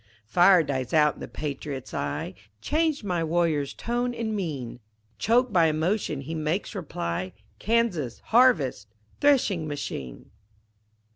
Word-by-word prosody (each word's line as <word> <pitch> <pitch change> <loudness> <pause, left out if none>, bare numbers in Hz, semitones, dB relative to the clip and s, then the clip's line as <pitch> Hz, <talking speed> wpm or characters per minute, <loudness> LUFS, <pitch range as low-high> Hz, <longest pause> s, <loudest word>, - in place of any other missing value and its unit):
Fire 175 - +5
dies 135 -1 -2
out 150 -1 +5
in - - -17
the - - -6
patriot's 140 -2 -5
eye, 70 0 -3 0.3
Changed 310 - 0
my 180 -4 -1
warrior's 160 -4 +1
tone 240 +1 -2
and 220 -2 -2
mien, 140 - -4 0.4
Choked 240 +1 +2
by 170 -3 +5
emotion 160 -1 -1
he 150 +4 -6
makes 160 +7 -2
reply, 95 - -4 0.3
"Kansas 205 - 0
harvest 180 - +3 0.3
threshing 235 - +3
machine!" 70 - -6
165 Hz, 125 wpm, -26 LUFS, 140-220 Hz, 0.4 s, Fire